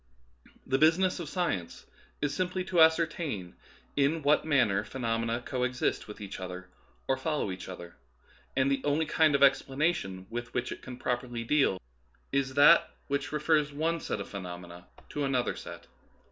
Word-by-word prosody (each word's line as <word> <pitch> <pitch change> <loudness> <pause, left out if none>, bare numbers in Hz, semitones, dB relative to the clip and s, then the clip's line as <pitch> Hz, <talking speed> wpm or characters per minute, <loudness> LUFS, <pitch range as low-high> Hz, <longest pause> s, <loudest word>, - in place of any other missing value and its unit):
The 135 +1 +1
business 170 +5 +4
of 165 -4 -5
science 150 - -2 0.4
is 145 - 0
simply 185 0 -1
to 180 -2 +2
ascertain 160 - +2 0.4
in 145 +3 +2
what 145 +2 +4
manner 125 -10 +3
phenomena 115 -1 -2
co 130 - -3
exist 125 0 -1
with 105 - -9
each 100 -2 -7
other 90 0 -7 0.4
or 135 - +2
follow 150 -6 -1
each 95 0 -7
other, 85 -2 -9 0.6
and 135 +1 +2
the 135 -1 +1
only 145 +2 +1
kind 155 -1 +3
of 140 - +1
explana 140 +4 +4
tion 95 - -6
with 120 +1 -5
which 125 0 -1
it - - -7
can 125 -1 -8
properly 120 -2 -2
deal 125 -7 +2 0.5
is 135 -1 0
that 145 +4 +7 0.2
which 140 0 -1
refers 150 -1 +2
one 160 +3 -1
set 110 - -3
of 100 - -5
phenomena 90 -2 -8 0.2
to 145 - -3
another 130 -3 0
set. - - -9
135 Hz, 165 wpm, -29 LUFS, 115-155 Hz, 0.6 s, that